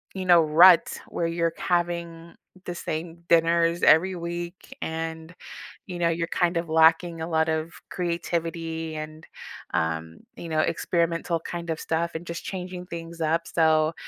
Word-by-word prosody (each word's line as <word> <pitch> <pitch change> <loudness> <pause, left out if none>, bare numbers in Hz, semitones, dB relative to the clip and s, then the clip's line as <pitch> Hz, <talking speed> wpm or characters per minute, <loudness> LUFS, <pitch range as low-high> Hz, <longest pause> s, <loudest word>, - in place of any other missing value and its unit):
you 190 -1 -4
know, 175 -2 +7
rut 170 +3 +6
where 170 - -2
you're 165 0 0
having 170 -1 -2 0.3
the 175 - -5
same 165 +1 -5
dinners 170 0 +3
every 185 +4 +5
week 175 +8 -6
and, 160 +1 -5 0.5
you 180 -2 -6
know, 170 -1 +2
you're 165 0 -1
kind 175 +1 0
of 170 -1 -2
lacking 165 +1 +4
a 160 - -3
lot 160 -1 +1
of 160 +1 -2 0.2
creativity 165 -2 -3
and, 155 0 -7 0.5
um, 80 0 -2 0.2
you 170 - -8
know, 155 -1 0
experimental 170 +1 0
kind 170 0 -5
of 160 - -3
stuff, 170 +1 -1
and 165 +2 -7
just 170 0 -5
changing 180 -1 -6
things 170 -1 -8
up. 165 +1 0
So, 160 -1 +3
165 Hz, 155 wpm, -25 LUFS, 160-175 Hz, 0.5 s, know